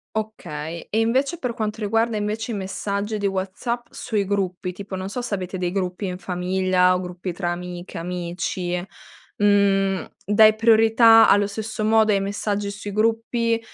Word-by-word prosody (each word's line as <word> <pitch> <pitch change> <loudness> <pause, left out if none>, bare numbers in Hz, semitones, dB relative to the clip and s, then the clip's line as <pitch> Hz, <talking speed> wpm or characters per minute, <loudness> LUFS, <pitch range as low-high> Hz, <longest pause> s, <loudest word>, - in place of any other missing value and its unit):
Okay, 170 -7 -5
e 220 - +1
invece 265 +9 +1
per 250 -2 -3
quanto 215 -1 -3
riguarda 225 +1 +1
invece 215 +3 -3
i - - -2
messaggi 200 +2 -3
di 205 - -3
WhatsApp 200 +5 -2
sui 210 -3 -2
gruppi, 185 -2 -2
tipo 195 +1 -7
non 190 +1 -4
so 245 +3 -4
se 230 - -4
avete 185 -1 -3
dei 180 -1 -1
gruppi 185 0 -2
in 180 -1 -4
famiglia 185 0 +1
o 180 - 0
gruppi 180 0 -5
tra 175 -1 -2
amiche, 175 +1 -6
amici, 175 +1 -3 0.6
mhmm, 195 -2 +3 0.2
dai 215 +2 +6
priorità 225 0 +6
allo 205 0 +4
stesso 215 +1 -4
modo 220 0 +4
ai 200 - +3
messaggi 205 0 -2
sui 205 0 -6
gruppi 230 +2 +1
200 Hz, 160 wpm, -23 LUFS, 185-220 Hz, 0.6 s, dai